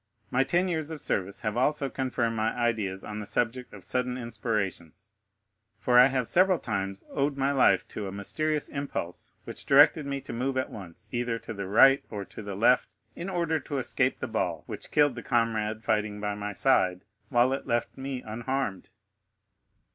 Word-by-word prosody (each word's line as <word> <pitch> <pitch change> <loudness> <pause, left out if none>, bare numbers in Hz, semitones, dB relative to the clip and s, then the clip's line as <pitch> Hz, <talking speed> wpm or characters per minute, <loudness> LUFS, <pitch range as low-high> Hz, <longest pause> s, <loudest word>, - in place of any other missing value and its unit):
My 125 +2 +3
ten 175 +7 +1
years 160 -4 -2
of 160 -2 -6
service 100 -6 -1
have 105 -2 -2
also 140 +3 +1
confirmed 125 -3 -1
my 110 0 0
ideas 110 -6 -1
on 105 0 -6
the 105 - -5
subject 120 +2 -1
of 100 -3 -12
sudden 125 +5 -1
inspirations, 105 -8 -4 0.7
for 125 -1 +4
I 125 - +9
have 130 -3 -1
several 185 0 +4
times 100 -6 -3
owed 140 0 0
my 135 +1 +1
life 110 -9 +3
to 105 - -5
a - - -5
mysterious 150 +10 -1
impulse 140 -11 -5
which - - -8
directed 145 +1 +6
me 140 0 -2
to 135 - -8
move 130 +3 -1
at 130 - -1
once 100 0 -10
either 120 -1 -1
to 115 - -8
the 100 -2 -5
right 135 +7 +6
or 100 -2 -5
to - - -10
the 100 -2 -6
left, 120 +5 +3 0.2
in 175 +3 -5
order 170 -4 0
to 145 0 -5
escape 130 0 +1
the 130 - -3
ball 90 -8 -2
which - - -8
killed 145 -2 +4
the 120 - -7
comrade 110 -2 0
fighting 105 -1 0
by 105 0 -2
my 105 0 -4
side, 95 -5 +2 0.2
while 125 0 +3
it 135 - -4
left 120 0 -1
me 135 -1 -5
unharmed." 115 -2 -3
120 Hz, 185 wpm, -28 LUFS, 105-135 Hz, 0.7 s, I